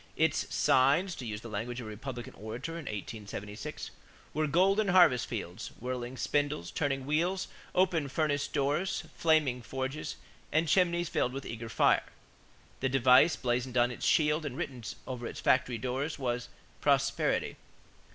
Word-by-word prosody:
Its - - +1
signs, 140 +9 +3
to 125 -6 -6
use 105 0 -4
the 115 - -8
language 115 +3 -4
of 120 - -6
a - - -6
Republican 120 +2 -7
orator 110 +9 -6
in 165 -2 -6
1876, 105 -1 -6 0.4
were 155 +1 +1
golden 195 +7 +3
harvest 175 -10 +5
fields, 100 -2 -5
whirling 125 +1 -4
spindles, 145 - -1
turning 135 -3 -1
wheels, 175 +6 0 0.3
open 180 -5 +2
furnace 145 0 0
doors, 145 +7 0
flaming 155 -6 +2
forges, 135 +4 -4 0.4
and 160 +2 +2
chimneys 175 0 +3
filled 125 -4 0
with 135 0 -5
eager 115 0 -6
fire. - - +3 0.7
The 135 - 0
device 130 +4 +6
blazoned 125 0 -1
on 120 0 +4
its 125 - -3
shield 150 0 +3
and 140 -3 -5
written 130 -8 -4 0.2
over 125 -2 -5
its - - -7
factory 130 -2 +2
doors 130 +6 -2
was 125 -2 -2 0.3
"prosperity." - - +1
130 Hz, 150 wpm, -31 LUFS, 120-155 Hz, 0.7 s, device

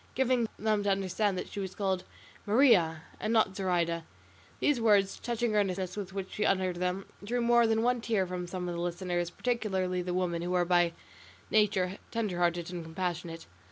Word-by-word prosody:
giving 255 -3 +2
them 215 -1 +1
to 205 - 0
understand 195 +1 0
that - - -4
she 205 - -7
was 190 -2 -5
called 190 -2 -1 0.4
"Maria" 205 - +4 0.2
and 215 - -1
not 215 -4 +3
"Zoraida." 170 -3 0 0.6
These 290 -5 +2
words, 205 -3 +4
and - - -19
the - - -12
touching 235 -2 0
earnestness 190 -3 0
with 200 -3 -5
which 195 -1 -5
she 210 - -2
uttered 185 -3 +1
them, 180 +2 -1 0.2
drew 240 +4 -1
more 235 0 +4
than 225 0 +2
one 245 0 +2
tear 220 -5 +1
from 180 -1 -4
some 180 0 -4
of 175 - -2
the 170 - -3
listeners, 175 0 -2
particularly 190 -5 -1
the 180 0 -3
women, 175 -2 0
who 180 +1 -1
are 175 -1 +3
by 175 -1 +3 0.6
nature 195 -3 +2
tender 210 -6 -2
hearted 175 0 0
and 175 -2 -4
compassionate. 165 0 -4
190 Hz, 195 wpm, -30 LUFS, 175-215 Hz, 0.6 s, Maria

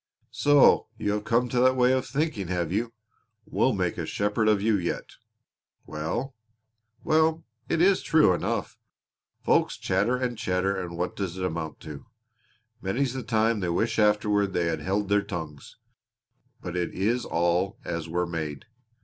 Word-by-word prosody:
"So 145 -1 +5
you 105 - -1
have 105 0 -2
come 120 +2 +2
to 125 - 0
that 130 +1 +4
way 125 0 +4
of 130 -1 0
thinking, 140 - -2
have 85 -1 -2
you? 115 +3 -1 0.5
We'll 130 - +1
make 90 -3 -1
a 80 - -3
shepherd 105 +2 0
of 105 -2 +4
you 110 +2 +2
yet! 90 -3 -3 0.7
Well, 100 - -4 0.7
well, 160 +1 +2 0.2
it 165 - +2
is 195 +1 +4
true 155 - +4
enough. - - -3 0.6
Folks - - +2
chatter 120 +5 +1
and 125 -2 -3
chatter 95 +2 0
and 90 -3 -5
what 90 +1 -2
does 95 -3 -4
it 90 - -2
amount 80 -3 -4
to? 75 -3 -9 0.7
Many's 120 +7 -1
the 130 - -4
time 110 -1 +1
they 90 -3 -2
wish 110 +7 0
afterward 105 -2 +2
they 90 -2 +1
had 85 -1 -1
held 100 +2 -1
their 100 +1 +3
tongues. 80 -7 -7 0.9
But 90 -1 -5
it 90 -1 -2
is 115 +6 0
all 85 +5 0
as 85 -1 -4
we're 90 +2 0
made. 80 -4 -5
100 Hz, 165 wpm, -26 LUFS, 85-120 Hz, 0.9 s, So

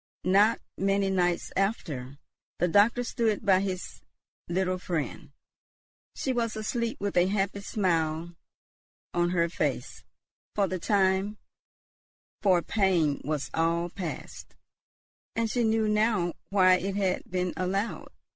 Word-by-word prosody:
Not 205 +4 +4 0.2
many 195 0 +2
nights 175 -2 0
after, 150 - -2 0.4
the 175 - +2
doctor 210 +7 +4
stood 225 -3 -1
by 190 -2 +5
his 190 -2 -4 0.5
little 185 +1 0
friend. 165 -8 -3 0.9
She 265 - -1
was 230 -2 -1
asleep, 230 +3 -2
with 200 0 -2
a 175 0 +4
happy 200 0 -1
smile 170 -4 0 0.8
on 175 0 +2
her 170 -1 +2
face; 170 - -3 0.5
for 200 -2 +2
the 185 0 -3
time 195 +2 +1 1.0
for 185 -4 +4
pain 180 -9 +1
was 145 -3 -3
all 170 +1 +1
past, 175 -5 -7 0.8
and 230 -1 0
she 245 - +1
knew 220 -1 +2
now 210 -5 +2 0.2
why 185 -2 +5
it 195 +2 -3
had 190 -2 0
been 180 -1 -1
allowed. 195 +4 -2
190 Hz, 125 wpm, -28 LUFS, 175-210 Hz, 1.0 s, by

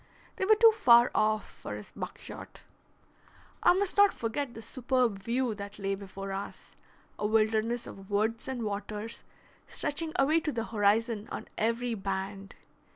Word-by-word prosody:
They 380 - 0
were 435 +2 +6
too 455 +1 +7
far 240 - +6
off 215 0 +1
for - - -8
his - - -10
buckshot. - - -8 1.0
I - - +6
must 390 +1 0
not 405 -1 +6
forget 235 +3 -3
the 225 - -7
superb 245 -2 0
view 235 +2 0
that 200 0 -8
lay 195 -1 -1
before 195 0 -6
us, 195 +1 -6 0.5
a 210 - +1
wilderness 220 +2 +1
of 195 0 -11
woods 220 +3 0
and 255 -3 -3
waters 210 +1 -4 0.4
stretching 315 +2 -2
away 300 +4 +4
to 310 -2 -2
the 230 -4 -2
horizon 215 0 +1
on - - -5
every 230 +2 0
band. 195 -1 -4
225 Hz, 155 wpm, -30 LUFS, 205-255 Hz, 1.0 s, too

